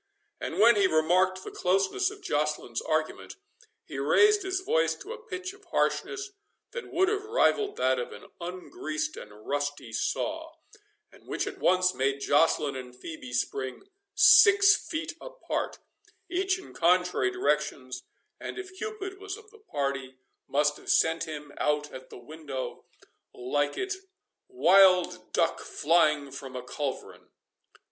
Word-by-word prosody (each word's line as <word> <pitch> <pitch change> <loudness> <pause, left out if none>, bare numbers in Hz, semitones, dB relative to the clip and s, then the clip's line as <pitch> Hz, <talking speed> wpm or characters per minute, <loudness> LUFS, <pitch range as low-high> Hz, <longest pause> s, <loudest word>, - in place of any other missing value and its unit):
And - - -4
when 230 0 +7
he 200 -1 +5
remarked 185 +4 +2
the - - -7
closeness 195 - +1
of 405 -1 -12
Joceline's 150 - -1
argument, 155 -1 -2 0.5
he - - -6
raised 420 -1 +4
his 375 0 -2
voice 475 +6 +1
to 420 +4 -8
a 470 - -10
pitch 370 -1 -5
of 400 0 -19
harshness 400 0 -1 0.4
that 480 -1 -7
would 375 +3 +3
have 415 0 0
rivalled 430 -2 +2
that 130 0 +2
of 120 - -4
an - - -11 0.2
ungreased 155 -3 -4
and 105 +1 -12
rusty 145 -4 -3
saw, 320 - -2 0.6
and - - -20
which - - -2
at - - -7
once 185 0 +3
made 135 +1 0
Joceline 145 -1 +2
and 125 -1 -8
Phœbe 130 -1 -9
spring 130 +2 -2 0.3
six 400 -1 +8
feet 320 -3 -5
apart, - - -4 0.5
each 375 +1 +1
in 375 - -12
contrary 180 - +2
directions, 145 - -1 0.4
and - - -6
if 375 0 -8
Cupid 390 -1 -6
was 405 0 -6
of 440 -1 -17
the 445 - -17
party, 140 - -3 0.3
must 150 +1 +1
have - - -11
sent 165 0 +3
him 150 -2 -7
out 150 0 0
at 130 0 -10
the - - -10
window 140 0 -7 0.5
like 145 +4 -1
it 385 0 -2 0.5
wild 185 - +4
duck 165 - +1
flying 150 -3 +2
from 135 -1 -8
a 125 - -5
culverin. 140 +1 -5
180 Hz, 145 wpm, -28 LUFS, -, 0.6 s, six